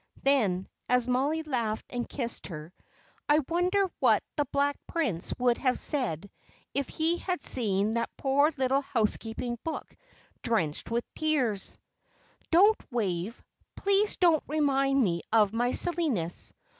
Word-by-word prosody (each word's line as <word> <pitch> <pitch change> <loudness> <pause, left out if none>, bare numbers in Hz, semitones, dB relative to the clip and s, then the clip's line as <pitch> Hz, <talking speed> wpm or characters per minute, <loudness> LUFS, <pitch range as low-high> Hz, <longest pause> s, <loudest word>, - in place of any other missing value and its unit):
Then, 210 -10 +2 0.2
as 250 -1 +3
Mollie 280 +6 +1
laughed 235 -7 -2
and 245 -1 -3
kissed 240 -4 -3
her, 155 -1 -8 0.6
"I 295 - +6
wonder 360 +4 +2 0.2
what - - +4
the 290 - +1
Black 280 +2 +1
Prince 240 - -2
would 245 -1 +2
have 255 -2 +1
said 200 - -2 0.4
if 280 -1 -1
he 325 +2 0
had 365 -1 -3
seen 210 -3 +1
that 235 0 -1
poor 285 +3 +3
little 265 +1 +2
housekeeping 235 -1 -1
book, 325 - -5 0.5
drenched 175 -11 -1
with 235 +1 0
tears?" 260 -11 0 0.7
"Don't, 405 +6 +5
Wave 205 -2 -2 0.3
please 400 +1 +2
don't 335 -4 +4
remind 275 -2 +2
me 170 -4 0
of 215 -2 +4
my 240 +2 +1
silliness. 275 - -1
255 Hz, 130 wpm, -29 LUFS, 220-300 Hz, 0.7 s, I